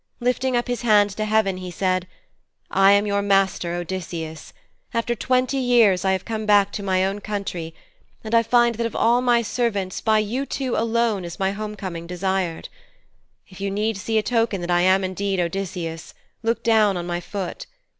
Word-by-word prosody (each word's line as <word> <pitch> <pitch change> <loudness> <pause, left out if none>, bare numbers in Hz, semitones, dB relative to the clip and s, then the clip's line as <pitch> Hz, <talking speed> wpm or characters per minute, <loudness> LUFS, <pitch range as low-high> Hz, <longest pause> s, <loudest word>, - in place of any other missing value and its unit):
Lifting 250 +1 0
up 240 - -1
his 245 -2 -2
hand 210 -3 +4
to 215 +2 -3
heaven 215 -3 +1
he 185 0 -6
said, 185 0 -1 0.6
'I 195 +1 +5
am 200 +1 +3
your 200 -1 0
master, 195 -3 +1
Odysseus. 170 -3 -5 0.4
After 230 +1 0
twenty 255 +3 0
years 235 -8 +4
I 190 0 +2
have 190 - -3
come 220 -1 -4
back 205 -1 +4
to - - -5
my 190 -1 +1
own 195 +2 -2
country, 190 -6 -4 0.5
and 220 +1 -6
I 230 - +6
find 240 +1 +3
that 230 +1 -2
of - - -10
all 235 +2 +3
my 240 -2 +3
servants, 205 -5 -2
by 220 -1 +3
you 235 +6 -1
two 260 -3 -2
alone 230 -3 +1
is 170 0 -7
my 195 -1 0
homecoming 200 -5 -6
desired. 180 -1 -2 0.8
If 185 0 -13
you 200 - -1
need 210 +3 -1
see 220 +3 -2
a 215 - +2
token 230 -4 0
that 175 0 -3
I 175 0 +3
am 190 +1 +4
indeed 190 +1 -2
Odysseus, 175 -2 -4 0.3
look 230 +1 -1
down 215 -4 +3
on 175 - -4
my 175 0 -2
foot. 200 - -6
200 Hz, 185 wpm, -22 LUFS, 185-230 Hz, 0.8 s, I